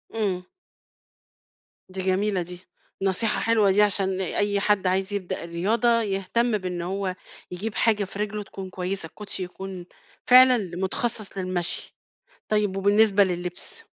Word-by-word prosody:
إمم. 190 -5 -1 1.4
دي 190 0 -5
جميلة 190 0 +1
دي. 180 +1 -8 0.4
نصيحة 195 +3 0
حلوة 220 -4 +3
دي 205 +2 +4
عشان 190 -2 +1
أي 205 +2 0
حد 200 -2 +2
عايز 190 +2 0
يبدأ 185 -4 -3
الرياضة، 220 +8 +2
يهتم 210 +3 0
بإن 180 -2 -4
هو 185 +1 -2 0.4
يجيب 205 +4 -4
حاجة 215 -3 +2
في 195 +1 -8
رجله 210 0 -2
تكون 195 -1 -8
كويسة. 185 -1 -4
الكوشي 195 +1 -6
يكون 185 0 -7 0.4
فعلًا 255 0 +8
ل 180 -3 -5
متخصص 215 +1 -2
للمشي. 185 -2 -3 0.5
طيب، 210 -2 +1
وبالنسبة 205 0 +4
للبس؟ 180 -1 -5
195 Hz, 135 wpm, -25 LUFS, 185-210 Hz, 1.4 s, فعلًا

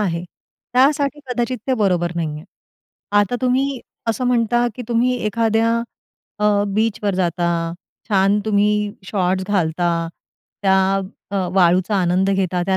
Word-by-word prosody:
आहे, 175 -4 -1 0.5
त्यासाठी 280 +3 +2
कदाचित 245 0 -1
ते 260 - +2
बरोबर 180 -6 +1
नाहीये. 155 -2 -3 0.7
आता 205 +4 +3
तुम्ही 260 +1 +1 0.3
असं 250 +3 0
म्हणता, 240 0 +2
की 250 - -6
तुम्ही 245 +2 +2
एखाद्या 230 +1 +1 0.6
अ, 210 - -1 0.3
बीचवर 215 -2 0
जाता, 175 -1 0 0.6
छान, 200 0 +3
तुम्ही 210 -1 +1 0.2
शॉर्ट्स 190 -1 0
घालता, 175 -3 +1 0.7
त्या 190 -1 +4 0.6
अ, 200 - -2 0.2
वाळूचा 185 +2 +3
आनंद 185 +2 +2
घेता, 185 -2 0
त्या 190 - +2
205 Hz, 120 wpm, -20 LUFS, 185-235 Hz, 0.7 s, त्या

